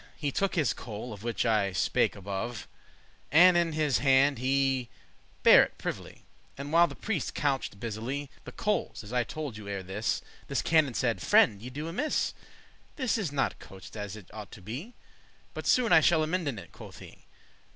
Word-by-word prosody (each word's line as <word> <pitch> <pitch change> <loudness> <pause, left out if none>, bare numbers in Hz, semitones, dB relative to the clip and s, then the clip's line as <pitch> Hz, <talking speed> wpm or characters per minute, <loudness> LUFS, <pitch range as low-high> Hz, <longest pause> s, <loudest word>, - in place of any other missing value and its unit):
He 145 -3 -2
took 195 +7 0
his 155 -7 +2
coal, 110 +1 -7
of 100 - -10
which 120 +2 -2
I 105 -4 +2
spake - - +1
above, 100 +3 -5 0.6
And 175 +4 +7
in 170 -2 +2
his 150 -7 +1
hand 135 +1 +4
he 135 -1 +1 0.5
bare - - +9
it - - -7
privily, - - -6 0.3
And 140 +2 -6
while 170 +1 +6
the - - -9
prieste 200 -10 -3
couched 135 -8 -1
busily 120 +6 -4
The - - -9
coales, 210 - -2
as 105 +3 -9
I 125 -1 +2
tolde 145 -5 -6
you 105 -1 -9
ere 100 -1 -4
this, 95 +4 -2 0.2
This - - -1
canon 155 -7 +3
saide, - - 0
"Friend, 100 -1 +4
ye 125 - -7
do 150 +5 -6
amiss; 290 - -1 0.6
This 260 -6 0
is 200 -10 -2
not 140 -2 -1
couched 95 -3 -12
as 105 -1 -5
it 105 -4 -13
ought 105 -2 -8
to 100 - -11
be, 140 - -7 0.6
But - - -6
soon 245 -7 +4
I 160 - +9
shall 160 0 +3
amenden 155 -6 -1
it," - - -10
quoth - - -12
he. - - -14
135 Hz, 185 wpm, -29 LUFS, 110-160 Hz, 0.6 s, bare